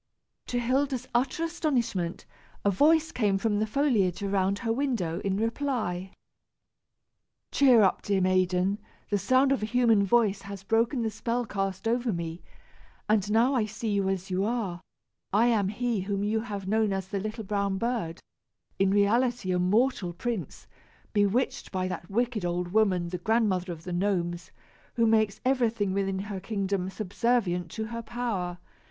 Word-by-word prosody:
To 245 - -2
Hilda's 255 +1 0
utter 255 +7 +1
astonishment, 245 - -1 0.4
a 200 - +4
voice 320 - +4
came 205 -8 +1
from 205 +1 0
the 215 - 0
foliage 215 - +1
around 195 0 +1
her 225 -1 -1
window, 230 -11 -1
in 195 -1 -1
reply. 225 -6 -2 1.4
"Cheer 255 -6 +6
up, 190 - +2
dear 200 -1 0
maiden; 185 +1 +2 0.3
the 205 - +2
sound 260 +7 +3
of 275 - +1
a 215 - -1
human 230 -3 +3
voice 205 -1 +2
has 200 -1 -8
broken 230 +4 +1
the 220 - -1
spell 235 +3 -2
cast 195 -1 -3
over 240 +1 +1
me, 170 -1 -4 0.7
and 215 -2 +3
I - - -7
now 235 +1 +3
see 220 +1 -4
you 200 -1 +1
as 190 0 -3
you 185 +1 +1
are. 205 -6 -2 0.5
I 215 +4 +4
am 220 -5 +2
he 235 +1 -1
whom 200 +1 -2
you 215 +2 +1
have 205 -4 -5
known 215 0 +2
as 190 -1 -4
the 200 - -2
little 215 +3 -4
brown 200 -1 -1
bird, 225 -7 -2 0.6
in 195 0 +4
reality 210 +1 +2
a 180 - +1
mortal 200 0 +1
prince, 195 - -4 0.5
bewitched 205 +5 +1
by 185 -1 -1
that 175 -2 -6
wicked 235 0 0
old 175 0 -1
woman, 185 -4 +2
the 180 0 -4
Grandmother 195 -3 +1
of 165 -1 -8
the 180 0 -5
Gnomes, 175 -2 -1 0.5
who 230 - +3
makes 220 -2 +2
everything 230 -7 +1
within 195 -1 0
her 195 0 -4
kingdom 195 -2 -2
subservient 195 -3 0
to 220 - -3
her 230 - -3
power. 215 -7 -3
205 Hz, 160 wpm, -28 LUFS, 190-235 Hz, 1.4 s, Cheer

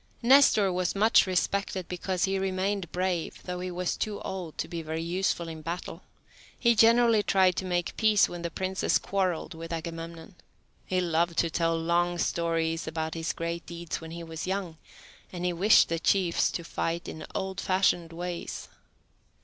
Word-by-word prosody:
Nestor 235 -7 +6
was 180 +1 -1
much 215 0 +5
respected 185 0 -1
because 180 0 -2
he 195 0 +1
remained 190 -1 -1
brave, 180 -2 -2
though 180 -1 -5
he 185 0 -4
was 180 0 -2
too 210 -1 -3
old 180 -5 -6
to - - -2
be 170 -1 -5
very 160 +1 -4
useful 175 0 -1
in 160 -1 -7
battle. 170 +3 -5 0.6
He 235 -1 +4
generally 230 0 +5
tried 190 -3 +3
to 190 - -2
make 175 -1 -1
peace 215 -2 +4
when 175 -1 -7
the 170 - -3
princes 190 +3 0
quarrelled 185 -3 -1
with 165 +1 -8
Agamemnon. 165 +1 -6 0.5
He 185 -1 +1
loved 170 0 0
to 165 - +2
tell 165 0 +1
long 175 +1 +1
stories 165 -1 -1
about 160 0 -3
his 165 0 -2
great 170 0 -4
deeds 170 -1 -5
when 165 - -8
he 170 +1 -7
was 165 +1 -6
young, 185 -4 -3 0.5
and 180 -1 -4
he 180 - +1
wished 195 +6 +5
the 165 0 -1
chiefs 180 -1 +2
to 170 - -3
fight 165 +1 -3
in 160 - -7
old 190 0 -3
fashioned 185 -3 +1
ways. 175 +1 -5
175 Hz, 175 wpm, -28 LUFS, 165-190 Hz, 0.6 s, Nestor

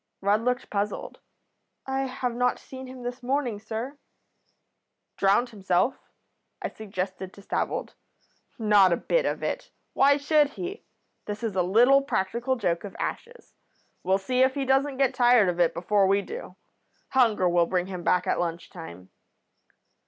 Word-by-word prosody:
"Rudd 205 +2 +2
looked 250 +1 -1
puzzled. 205 0 -3 0.7
'I 265 0 -2
have 255 -1 -3
not 250 +1 +1
seen 260 0 -10
him 255 -1 -10
this 245 +1 -5
morning, 250 -4 -1
sir.' 225 +6 -6 1.2
"'Drowned 200 +6 +3
himself?' 195 +2 -1 0.5
I - - -3
suggested 190 -3 -5
to 200 - -15
Stavold. - - -2 0.6
"'Not 210 -4 +5
a 170 - +2
bit - - +1
of - - -3
it. - - -3 0.2
Why 280 +1 +5
should 295 0 +3
he? 370 +3 -6 0.4
This 210 +2 -5
is 220 -4 -2
a 185 - +3
little 240 +10 +5
practical 240 0 -1
joke 170 -8 -1
of 205 - -8
Ash's. 485 +1 -6 0.5
We'll 190 +2 +2
see 250 +6 0
if 260 +1 +4
he 275 -1 -1
doesn't 270 +1 +1
get 270 -2 +2
tired 245 -4 +5
of 175 0 -3
it 170 -2 +4
before 195 +3 +2
we 200 +1 +2
do. 470 +3 -8 0.5
Hunger 225 -8 +3
will 175 -1 +3
bring 180 0 0
him 185 -2 -6
back 180 +1 +2
at - - 0
lunch 170 -1 -3
time.' 95 - -10
225 Hz, 160 wpm, -26 LUFS, 190-260 Hz, 1.2 s, Not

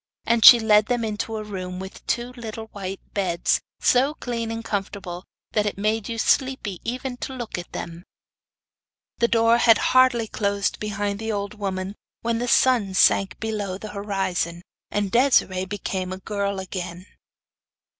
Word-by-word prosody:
And 230 -1 +2
she 240 - +11
led 215 -1 +4
them 245 -2 0
into 220 +1 -3
a 215 - -4
room 185 -3 -6
with 190 +1 -9
two 240 +1 -1
little 225 -2 -7
white 195 -1 -6
beds, 180 -4 +1 0.2
so 270 +4 +3
clean 230 -4 -4
and 225 0 -5
comfortable 195 -3 -4 0.3
that 210 -1 +1
it 205 - -3
made 215 +2 -1
you 230 - -3
sleepy 260 -7 0
even 250 +1 -4
to 265 - -5
look 240 -3 -5
at 175 - -9
them. 170 +1 -7 1.2
The 235 - +4
door 230 0 +4
had 230 -2 +6 0.2
hardly 255 -3 +5
closed 200 -1 -1
behind 205 -1 -2
the 225 0 -3
old 200 -1 -3
woman 195 -2 -4 0.3
when 230 0 -1
the 245 - -2
sun 235 -7 +3
sank 195 +1 +3
below 210 -4 -3
the 215 +2 -8
horizon, 190 -4 -2 0.3
and 205 -2 -1
Desiree 235 -7 +3
became 185 -1 -4
a 185 - -4
girl 200 0 -3
again. 185 -1 -6
210 Hz, 160 wpm, -24 LUFS, 190-230 Hz, 1.2 s, she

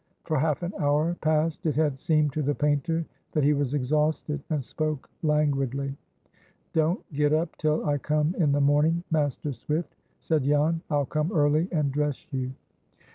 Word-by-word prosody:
For 155 -3 0
half 155 +3 0
an 175 +3 -3
hour 150 +4 +2
past 155 +1 +1
it 150 - +1
had 150 -3 +1
seemed 155 -3 +2
to 155 - -1
the 145 0 0
painter 150 +3 0 0.3
that 150 - +2
he 145 +2 +4
was 140 -1 0
exhausted, 150 +2 0
and 150 -4 -1
spoke 155 +1 -3
languidly. 140 -3 0 0.8
"Don't 160 +4 +2
get 145 +1 +2
up 160 +1 0
till 155 +1 +1
I 145 -1 +1
come 150 +3 +1
in 150 -5 +3
the 145 0 +2
morning, 150 +4 +3
Master 145 -2 0
Swift," 155 +6 -3 0.2
said 160 -2 +1
Jan; 150 +4 +2
"I'll 145 -2 +1
come 155 +6 -1
early 155 -1 +3
and 150 -5 +1
dress 150 0 -1
you." 130 -1 -1
150 Hz, 170 wpm, -27 LUFS, 145-155 Hz, 0.8 s, he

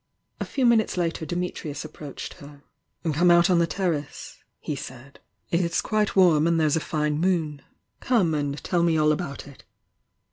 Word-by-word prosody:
A - - -2
few 265 - -1
minutes 225 -5 +3
later 165 -2 -2
Dimitnus 175 -4 -4
aPproached 150 -2 -8
her 145 -2 -13 0.5
"Come 175 +4 +3
out 175 +1 +5
on 175 - +4
the 170 - +2
terrace," 160 -5 -3 0.2
he 150 - -4
said 130 +1 -10 0.3
.J^LS"^ 185 +5 0
warm 170 -5 +5
and 170 -1 +2
there's 155 -1 +2
a - - +2
fine 150 -1 -1
moon. 160 -5 0 0.4
Come 205 -10 +2
and 145 -1 -2
teU 175 -2 +1
me 170 -1 +2
all 155 0 +4
about 150 -2 -4
it!" 140 - -15
165 Hz, 165 wpm, -25 LUFS, 150-180 Hz, 0.5 s, out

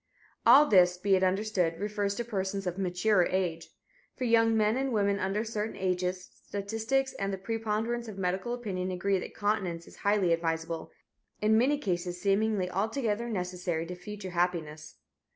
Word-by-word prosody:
All 295 - +9
this, 180 -7 +5
be 195 +1 +3
it 185 - +1
understood, 185 -3 +1
refers 205 -1 -1
to 240 - -3
persons 195 -3 -3
of 180 +1 -3
mature 185 +1 +2
age. 175 -3 -2 0.5
For 260 - -5
young 225 -1 +4
men 215 +1 +3
and 270 0 -1
women 200 -2 +1
under 195 +3 -1
certain 220 -1 -3
ages, 180 -1 -2
statistics 225 +7 -1
and 195 0 -2
the 195 - -3
preponderance 225 +3 -2
of 210 -3 -8
medical 190 +5 -1
opinion 190 -6 -3
agree 185 +1 0
that - - -8
continence 190 -5 -1
is - - -15
highly 200 -4 +2
advisable, 165 0 -2 0.5
in 215 +1 +3
many 265 +6 +3
cases 180 -7 -2
seemingly 200 0 +1
altogether 220 +4 -1
necessary 180 -4 -2
to 180 +2 -6
future 190 +1 -8
happiness. 170 -4 -2
195 Hz, 160 wpm, -29 LUFS, 180-220 Hz, 0.5 s, All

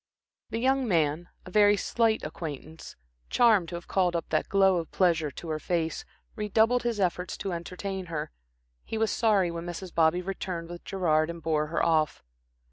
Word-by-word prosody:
The 225 - -3
young 260 +2 +2
man, 165 -2 +1 0.2
a 185 - -10
very 205 +1 +5
slight 225 +2 +1
acquaintance, 155 0 -7 0.3
charmed 215 -8 +4
to 175 - -5
have 170 - -8
called 180 -2 +1
up 165 - -2
that 155 - 0
glow 195 -2 +4
of 165 -2 -3
pleasure 165 -5 +2
to 160 +4 -9
her 155 -1 -2
face, 165 -1 -2 0.3
redoubled 220 +3 +2
his 235 -3 -2
efforts 180 -1 -1
to 195 - -3
entertain 185 +2 -5
her. 160 - -4 0.5
He 225 - -4
was 220 0 +1
sorry 205 -6 +2
when 170 +1 -6
Mrs. 175 +1 -6
Bobby 165 +2 +3
returned 180 -3 -4
with 175 0 -8
Gerard, 160 -5 +1
and 170 0 -6
bore 155 -2 0
her 165 - 0
off. 155 -2 +1
175 Hz, 180 wpm, -28 LUFS, 165-200 Hz, 0.5 s, very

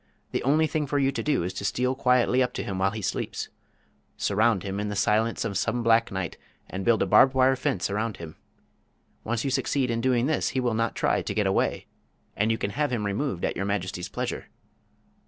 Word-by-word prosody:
"The - - -1
only 150 +5 +3
thing 155 -2 -1
for 145 - 0
you 135 -1 +2
to 140 - -3
do 150 - +1
is 90 - -3
to - - -6
steal 125 +6 0
quietly 125 -1 +3
up 125 -1 0
to - - -3
him 95 -2 -4
while 95 +1 +3
he 110 +1 -6
sleeps. - - -3 0.7
Surround 105 -1 +2
him 100 0 -3
in 105 0 -2
the 105 - -3
silence 110 +3 +1
of 100 -4 -1
some 120 +1 -1
black 115 0 +3
night, 95 -2 -4 0.3
and 95 +1 -5
build 115 0 +3
a - - 0
barbed 130 0 +5
wire 130 0 +4
fence 95 -7 -1
around 105 +1 -2
him. 80 -2 -9 0.9
Once 115 +2 -2
you 135 - 0
succeed 135 -1 0
in 115 0 -1
doing 125 -1 +2
this 155 +2 +1
he - - +3
will 125 -2 0
not 115 +1 0
try - - +1
to - - -4
get - - +1
away, - - 0 0.5
and 105 +2 +1
you 115 - +1
can 100 - -2
have 145 +4 -1
him 110 -4 -1
removed 100 - -1
at - - -2
Your 95 - -2
Majesty's 95 -3 -3
pleasure." - - -4
115 Hz, 225 wpm, -26 LUFS, 100-130 Hz, 0.9 s, barbed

